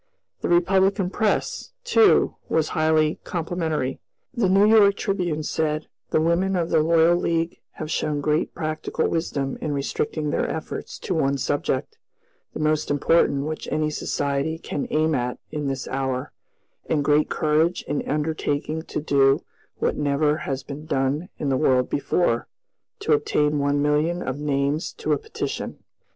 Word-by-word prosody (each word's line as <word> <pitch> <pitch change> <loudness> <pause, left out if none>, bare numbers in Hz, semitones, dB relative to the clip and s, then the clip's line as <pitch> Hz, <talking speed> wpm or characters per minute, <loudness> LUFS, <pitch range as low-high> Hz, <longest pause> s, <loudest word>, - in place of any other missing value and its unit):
The - - -2
Republican 190 +2 +3
press, 215 - -1
too, 455 -3 +4
was 155 -1 +1
highly 155 0 +2
complimentary. 160 -6 -2 0.3
The 235 -7 +1
New 195 +2 +5
York 210 -2 +6
Tribune 175 -6 -1
said: 155 0 -1 0.2
"The - - +2
women 170 +4 +2
of 170 -2 -1
the 160 - +4
Loyal 165 +1 +4
League 165 -1 -1
have 155 0 -6
shown 150 -2 0
great 150 +2 0
practical 155 0 -2
wisdom 140 -5 -2
in 150 - -2
restricting 145 +2 -2
their - - 0
efforts 160 - -5
to 185 - -3
one 140 -4 +1
subject, 130 - -2 0.6
the - - -4
most 155 0 +1
important 145 -1 +2
which 155 0 -4
any 155 0 0
society 145 +1 -1
can 145 -3 -4
aim 155 +1 +2
at 125 -2 -1
in 150 -2 -3
this 135 -1 -3
hour, 130 -1 -2 0.6
and 145 -3 +1
great 150 +1 +3
courage 155 +3 +1
in 145 0 -2
undertaking 155 0 -1
to - - -4
do 140 -2 +3 0.3
what - - -1
never 150 +1 +2
has 135 -1 -2
been 145 +3 -8
done 140 +7 0
in 145 - -2
the 135 - +2
world 130 -4 +2
before, 140 -4 +1 0.5
to 155 - +2
obtain 150 0 +1
one 145 0 +1
million 155 +4 +1
of 130 +2 -3
names 145 +2 -1
to - - -1
a - - 0
petition." 440 0 -5
155 Hz, 155 wpm, -24 LUFS, 145-165 Hz, 0.6 s, York